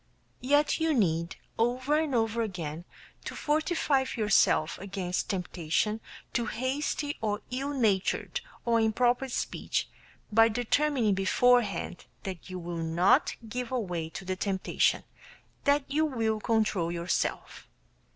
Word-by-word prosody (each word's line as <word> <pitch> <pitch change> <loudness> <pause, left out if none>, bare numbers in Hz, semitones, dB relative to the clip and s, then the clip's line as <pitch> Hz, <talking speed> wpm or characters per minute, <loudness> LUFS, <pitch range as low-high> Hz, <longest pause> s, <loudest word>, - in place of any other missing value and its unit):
Yet 290 +5 +2
you 320 -1 +2
need, 170 -6 +1 0.2
over 255 +5 +1
and 305 -5 -1
over 225 0 +1
again, 175 -6 -4 0.4
to - - -6
fortify 305 -2 +1
yourself 210 -7 +3
against 190 -2 -3
temptation 185 +3 -1 0.3
to 235 -2 0
hasty 285 +5 -2
or 210 -1 -1
ill 270 +3 -2
natured 230 - 0 0.2
or 230 -1 +3
improper 240 +4 +2
speech - - -2 0.4
by 225 +2 +6
determining 245 0 +1
beforehand 200 0 +2 0.2
that 190 -2 -6
you 185 - -5
will 175 -1 -5
not 175 - +3
give 245 +2 -4
way 180 -10 -2
to 190 +3 -8
the 185 0 -1
temptation; 190 0 +1 0.6
that 285 0 +4
you 305 +3 +1
will 225 -5 0
control 215 -7 +1
yourself. 170 +1 -2
225 Hz, 120 wpm, -29 LUFS, 185-260 Hz, 0.6 s, by